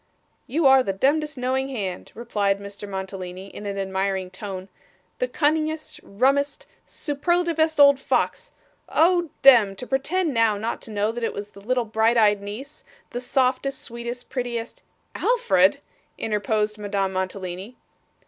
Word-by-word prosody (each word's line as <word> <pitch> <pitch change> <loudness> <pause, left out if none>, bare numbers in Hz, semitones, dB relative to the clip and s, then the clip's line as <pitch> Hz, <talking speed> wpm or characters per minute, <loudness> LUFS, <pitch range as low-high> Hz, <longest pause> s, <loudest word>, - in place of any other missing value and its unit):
'You 310 +4 0
are 265 0 +7
the 195 -6 -1
demdest, 295 +8 +1
knowing 260 +2 -1
hand,' 195 -8 -5
replied 205 -4 0
Mr. 200 0 -8
Mantalini, 190 -1 -6
in 205 - -8
an 200 0 -3
admiring 190 -1 -2
tone, 190 -1 -7 0.5
'the - - +1
cunningest, 310 -3 -1
rummest, 275 +7 0 0.2
superlativest 320 +1 0
old 280 -1 +7
fox - - -1 0.4
oh 345 0 +3
dem! 230 -8 +7
to 220 - -7
pretend 305 +6 0
now 225 -3 +3
not 225 +3 -3
to 225 - -10
know 210 +1 0
that 235 +1 -6
it - - -1
was 205 +1 -7
the 200 - -14
little 245 +3 0
bright 220 +2 +2
eyed 210 -2 +4
niece 250 +9 -8 0.3
the 245 - -4
softest, 265 +1 0
sweetest, 235 0 -7
prettiest 240 -3 -4 0.2
' - - -43
'Alfred!' 485 0 +3 0.4
interposed 210 0 -1
Madame 200 -2 -1
Mantalini. 185 +3 -4
230 Hz, 145 wpm, -24 LUFS, 200-275 Hz, 0.5 s, are